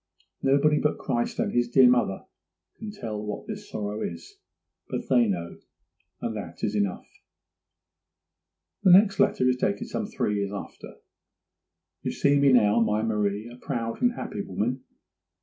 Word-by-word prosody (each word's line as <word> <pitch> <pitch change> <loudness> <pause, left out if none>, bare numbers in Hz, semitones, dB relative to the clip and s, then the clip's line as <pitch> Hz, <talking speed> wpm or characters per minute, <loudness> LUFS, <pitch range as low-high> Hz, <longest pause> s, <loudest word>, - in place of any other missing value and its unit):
Nobody 145 +2 +3
but 150 - 0
Christ 120 0 -2
and - - 0
His 120 0 +1
dear 130 +1 +6
mother 120 -6 +1 0.5
can 220 - -8
tell 110 - -6
what 105 - -5
this 210 -1 -7
sorrow 105 +1 -4
is; 85 -4 -7 0.5
but - - -4
they 120 -3 +4
know, 85 -4 -4 0.6
and 115 - -3
that 90 -5 -8
is 105 - 0
enough.' 100 -3 -1 1.8
The 185 -3 +6
next 195 +2 +5
letter 125 - +3
is 125 0 +2
dated 100 -5 -1
some - - -3
three 105 0 -1
years 100 0 -2
after. 100 - -8 1.1
'You - - -3
see 145 0 +3
me 140 -1 +5
now, 110 -3 +4
my 110 -1 +1
Marie, 105 -1 -1
a 120 +1 -11
proud 115 - -3
and 245 -1 +3
happy 105 - -5
woman. 110 +8 -3
115 Hz, 155 wpm, -26 LUFS, 105-135 Hz, 1.8 s, dear